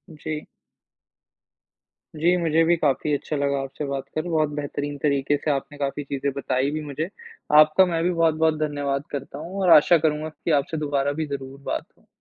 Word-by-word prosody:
जी। 155 Hz, 0 st, -5 dB, 1.7 s
जी, 170 Hz, +4 st, +3 dB
मुझे 165 Hz, -1 st, +2 dB
भी 170 Hz, +1 st, +4 dB
काफ़ी 150 Hz, 0 st, +1 dB
अच्छा 145 Hz, +2 st, -2 dB
लगा 140 Hz, -1 st, 0 dB
आपसे 135 Hz, +2 st, -5 dB
बात 140 Hz, -1 st, -3 dB
कर, 155 Hz, -, +1 dB
बहुत 155 Hz, -3 st, +1 dB
बेहतरीन 145 Hz, 0 st, -4 dB
तरीके 140 Hz, 0 st, +1 dB
से 150 Hz, -, -1 dB
आपने 140 Hz, +1 st, -3 dB
काफ़ी 140 Hz, +1 st, -2 dB
चीज़ें 140 Hz, 0 st, -2 dB
बताईं 135 Hz, 0 st, 0 dB
भी 155 Hz, -, -2 dB
मुझे। 150 Hz, +4 st, -4 dB, 0.5 s
आपका 155 Hz, +5 st, +6 dB
मैं 165 Hz, -2 st, -1 dB
भी 180 Hz, -, +2 dB
बहुत-बहुत 160 Hz, -2 st, +2 dB
धन्यवाद 145 Hz, -2 st, -1 dB
करता 140 Hz, -1 st, -6 dB
हूँ, 180 Hz, +5 st, -5 dB
और 185 Hz, -, +3 dB
आशा 170 Hz, +3 st, +5 dB
करूँगा 155 Hz, 0 st, 0 dB
कि 160 Hz, +2 st, -4 dB
आपसे 160 Hz, +3 st, -6 dB
दोबारा 145 Hz, -2 st, 0 dB
भी -, -, 0 dB
ज़रूर 135 Hz, -1 st, -6 dB
बात -, -, -3 dB
हो। -, -, -29 dB
150 Hz, 180 wpm, -24 LUFS, 140-160 Hz, 1.7 s, आपका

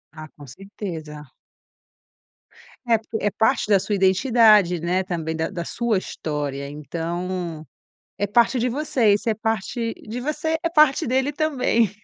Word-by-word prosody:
Ah, 155 Hz, 0 st, -9 dB
com 145 Hz, -, -14 dB
certeza. 160 Hz, -, -8 dB, 1.6 s
É, 230 Hz, -2 st, +4 dB
porque 220 Hz, +1 st, -6 dB
é 205 Hz, -, +2 dB
parte 220 Hz, 0 st, +1 dB
da 200 Hz, -2 st, +5 dB
sua 205 Hz, +2 st, -2 dB
identidade, 195 Hz, -2 st, +4 dB
né, 180 Hz, +2 st, 0 dB
também 160 Hz, -3 st, -3 dB
da 160 Hz, 0 st, -2 dB
da 175 Hz, -4 st, -5 dB
sua 235 Hz, +2 st, -1 dB
história, 145 Hz, -5 st, -4 dB
então 170 Hz, +2 st, -5 dB, 0.5 s
é 205 Hz, 0 st, -1 dB
parte 235 Hz, +4 st, +3 dB
de 250 Hz, -, +1 dB
você, 250 Hz, -5 st, +2 dB
isso 210 Hz, +3 st, -1 dB
é -, -, +2 dB
parte 225 Hz, +2 st, -2 dB
de 230 Hz, +3 st, -8 dB
você, 305 Hz, +4 st, -2 dB
é 335 Hz, -, 0 dB
parte 305 Hz, -3 st, +4 dB
dele 265 Hz, +3 st, +1 dB
também. 270 Hz, -7 st, +1 dB
205 Hz, 150 wpm, -23 LUFS, 170-235 Hz, 1.6 s, da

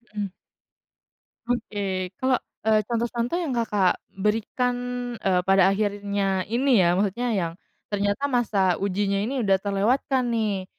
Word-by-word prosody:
Mhm. 205 Hz, -2 st, -2 dB, 1.2 s
Oke, 205 Hz, -6 st, -2 dB
kalau, 260 Hz, -1 st, +2 dB, 0.3 s
eee, 215 Hz, -1 st, +4 dB
contoh-contoh 235 Hz, +5 st, -1 dB
yang 330 Hz, -7 st, -2 dB
Kakak 210 Hz, -6 st, +1 dB, 0.2 s
berikan, 225 Hz, +5 st, 0 dB, 0.5 s
eee, 185 Hz, -2 st, +2 dB
pada 195 Hz, -1 st, +5 dB
akhirnya 200 Hz, -1 st, 0 dB
ini, 245 Hz, -2 st, +3 dB
ya, 175 Hz, 0 st, +3 dB
maksudnya 205 Hz, +5 st, 0 dB
yang 170 Hz, -3 st, -1 dB, 0.4 s
ternyata 205 Hz, +5 st, 0 dB
masa 240 Hz, -6 st, 0 dB, 0.2 s
ujinya 200 Hz, 0 st, 0 dB
ini 255 Hz, +2 st, -1 dB
udah 195 Hz, -1 st, +4 dB
terlewatkan, 235 Hz, +6 st, +1 dB
nih, 210 Hz, -4 st, -1 dB
205 Hz, 120 wpm, -25 LUFS, 195-240 Hz, 1.2 s, pada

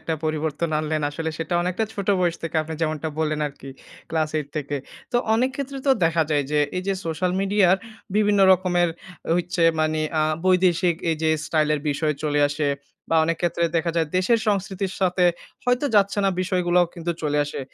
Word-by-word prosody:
একটা 160 Hz, -, -2 dB
পরিবর্তন 155 Hz, +1 st, -1 dB
আনলেন। 155 Hz, 0 st, -1 dB
আসলে 160 Hz, +2 st, -3 dB
সেটা 165 Hz, +1 st, -2 dB
অনেকটা 185 Hz, +5 st, -1 dB
ছোট 200 Hz, -1 st, -5 dB
বয়স 175 Hz, -2 st, +1 dB
থেকে 165 Hz, -1 st, -3 dB
আপনি 160 Hz, +1 st, -6 dB
যেমনটা 155 Hz, -1 st, -1 dB
বললেন 155 Hz, -1 st, 0 dB
আরকি 140 Hz, -1 st, -10 dB, 0.4 s
ক্লাস 155 Hz, -1 st, 0 dB
৮ 145 Hz, -2 st, -5 dB
থেকে। 145 Hz, -1 st, -2 dB, 0.4 s
তো -, -, +3 dB, 0.2 s
অনেক 255 Hz, +3 st, +2 dB
ক্ষেত্রে 275 Hz, -1 st, -4 dB
তো 275 Hz, -, +5 dB
দেখা 165 Hz, 0 st, +3 dB
যায় 145 Hz, -2 st, +2 dB
যে, 150 Hz, -, +2 dB, 0.2 s
এই 180 Hz, -, -1 dB
যে 195 Hz, -, +2 dB
সোশ্যাল 180 Hz, +3 st, -1 dB
মিডিয়ার 195 Hz, -2 st, +3 dB, 0.4 s
বিভিন্ন 210 Hz, -1 st, +3 dB
রকমের 175 Hz, -1 st, +2 dB, 0.5 s
হইচ্ছে 175 Hz, 0 st, -1 dB, 0.2 s
মানে 155 Hz, 0 st, +1 dB, 0.2 s
আ -, -, +3 dB, 0.2 s
বৈদেশিক 180 Hz, -1 st, +3 dB, 0.2 s
এই 160 Hz, -, 0 dB
যে 160 Hz, -, +3 dB, 0.2 s
স্টাইল 155 Hz, -2 st, +1 dB
এর 150 Hz, -, -3 dB
বিষয় 150 Hz, +1 st, 0 dB
চলে 145 Hz, -1 st, +1 dB
আসে। 145 Hz, 0 st, -1 dB, 0.4 s
বা 165 Hz, -, +3 dB
অনেক 165 Hz, +1 st, 0 dB
ক্ষেত্রে 170 Hz, 0 st, +1 dB
দেখা 165 Hz, +1 st, +1 dB
যায় 165 Hz, -2 st, +2 dB
দেশের 205 Hz, +6 st, +3 dB
সংস্কৃতির 195 Hz, -1 st, -1 dB
সাথে 180 Hz, -1 st, +2 dB, 0.4 s
হয়তো 250 Hz, +3 st, +2 dB
যাচ্ছে 200 Hz, 0 st, +3 dB
না 195 Hz, -, +3 dB
বিষয়গুলাও 180 Hz, -1 st, +2 dB
কিন্তু 170 Hz, -1 st, -3 dB
চলে 150 Hz, -1 st, 0 dB
আসে। 145 Hz, -, -6 dB
170 Hz, 185 wpm, -23 LUFS, 155-185 Hz, 0.5 s, তো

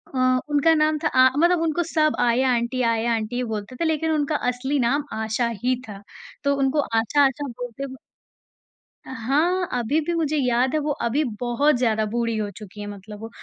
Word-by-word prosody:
अ, 255 Hz, 0 st, +3 dB
उनका 295 Hz, +3 st, +4 dB
नाम 305 Hz, 0 st, +2 dB
था -, -, +3 dB
आ 260 Hz, -1 st, +5 dB
मतलब 345 Hz, +2 st, +3 dB
उनको 330 Hz, +1 st, 0 dB
सब 310 Hz, -1 st, +2 dB
आया 245 Hz, +2 st, +2 dB
आंटी 235 Hz, +2 st, -1 dB
आया 230 Hz, +1 st, 0 dB
आंटी 220 Hz, +2 st, -3 dB
ही 250 Hz, -, -1 dB
बोलते 220 Hz, 0 st, -5 dB
थे, 330 Hz, -, -2 dB
लेकिन 320 Hz, 0 st, 0 dB
उनका 300 Hz, -1 st, 0 dB
असली 265 Hz, +3 st, -1 dB
नाम 270 Hz, +4 st, +1 dB
आशा 220 Hz, +2 st, -1 dB, 0.2 s
ही 255 Hz, 0 st, +2 dB
था, 200 Hz, -2 st, -9 dB, 0.4 s
तो 280 Hz, -1 st, +2 dB
उनको 275 Hz, +2 st, +1 dB
आशा, 230 Hz, +5 st, +2 dB
आशा 275 Hz, +2 st, -1 dB
बोलते 245 Hz, +2 st, -6 dB
ब 260 Hz, -, -9 dB, 1.1 s
अ, -, -, -9 dB
हाँ, 305 Hz, +10 st, 0 dB
अभी 260 Hz, +7 st, +1 dB
भी 320 Hz, +3 st, -3 dB
मुझे 310 Hz, -2 st, 0 dB
याद 250 Hz, -1 st, +1 dB
है -, -, +3 dB
वो 300 Hz, 0 st, -2 dB, 0.2 s
अभी 275 Hz, +6 st, +1 dB, 0.2 s
बहुत 250 Hz, +4 st, +2 dB
ज़्यादा 220 Hz, -3 st, +1 dB
बूढ़ी 230 Hz, -1 st, -1 dB
हो 210 Hz, -1 st, -2 dB
चुकी 210 Hz, -1 st, -11 dB
हैं 205 Hz, -, -5 dB
मतलब 205 Hz, +1 st, -10 dB
वो 225 Hz, -, -7 dB
255 Hz, 200 wpm, -23 LUFS, 230-295 Hz, 1.1 s, आ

